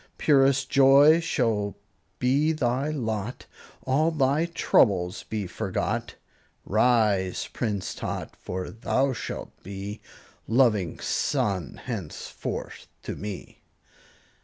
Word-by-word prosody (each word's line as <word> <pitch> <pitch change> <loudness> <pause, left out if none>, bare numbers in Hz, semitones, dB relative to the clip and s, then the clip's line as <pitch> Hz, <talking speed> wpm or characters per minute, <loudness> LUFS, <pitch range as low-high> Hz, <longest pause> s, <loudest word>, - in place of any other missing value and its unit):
Purest 135 -2 +3
joy 140 +3 +6
shall 115 -11 0 0.4
be 140 +5 +2
thy 135 0 0
lot, 115 -5 -3 0.4
All 145 +5 +2
thy 150 +1 +1
troubles 95 - +2
be 105 -2 -4
forgot; 90 - -3 0.5
Rise, 110 -4 +2
Prince 105 -6 -2
Tot, - - -5
for 90 0 -5
thou 130 +4 0
shalt - - -6
be 100 +2 -7 0.5
Loving 110 - +2
son 95 -4 -1
henceforth 105 - -6 0.2
to - - -5
me! 100 -5 -8
120 Hz, 95 wpm, -26 LUFS, 100-135 Hz, 0.5 s, joy